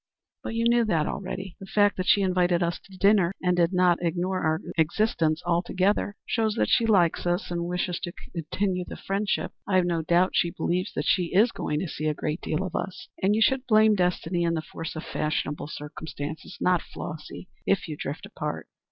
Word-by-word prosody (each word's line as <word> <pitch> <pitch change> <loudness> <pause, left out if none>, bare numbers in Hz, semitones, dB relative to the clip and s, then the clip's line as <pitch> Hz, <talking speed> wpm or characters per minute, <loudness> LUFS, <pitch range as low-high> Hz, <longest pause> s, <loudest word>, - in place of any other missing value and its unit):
"But 225 - -5
you 230 0 +2
knew 235 0 +4
that 165 -7 +1
already. 190 0 -5
The 195 - -9
fact 205 0 +3
that 185 0 -2
she 200 - +5
invited 180 -1 +2
us 170 0 -1
to 190 -1 -15
dinner 195 -2 +4
and 180 -1 +1
did 170 0 +3
not 180 -2 +3
ignore 180 +2 0
our 160 0 +1 0.2
existence 165 -1 +1
altogether 185 +4 +1
shows 220 -2 0
that - - +1
she 230 - +3
likes 180 -5 +3
us 175 +1 -1
and 170 0 -1
wishes 180 0 -1
to 175 - -4 0.2
continue 180 +3 -1
the - - -8
friendship. 200 +1 -1 0.2
I've 185 -2 +3
no 170 -2 0
doubt 175 +3 +3
she 170 - +2
believes 175 +4 -1
that 145 - -1
she 180 0 +3
is 225 +5 +5
going 150 0 -2
to 190 - -2
see 155 0 -3
a 150 - 0
great 155 +3 -3
deal 155 +4 -1
of 185 - -5
us, 240 +6 -4
and 200 +2 +3
you 220 - +4
should 265 +3 +1
blame 215 -1 +6
destiny 180 -2 0
and 170 -1 +1
the 155 - -3
force 165 0 -7
of 155 - -5
fashionable 150 -1 -2
circumstances, 150 +2 -7
not 180 -2 +3
Flossy, 155 +3 -8 0.2
if 195 - +2
you 155 - -4
drift 145 0 -5
apart." - - -5
180 Hz, 205 wpm, -26 LUFS, 165-195 Hz, 0.2 s, blame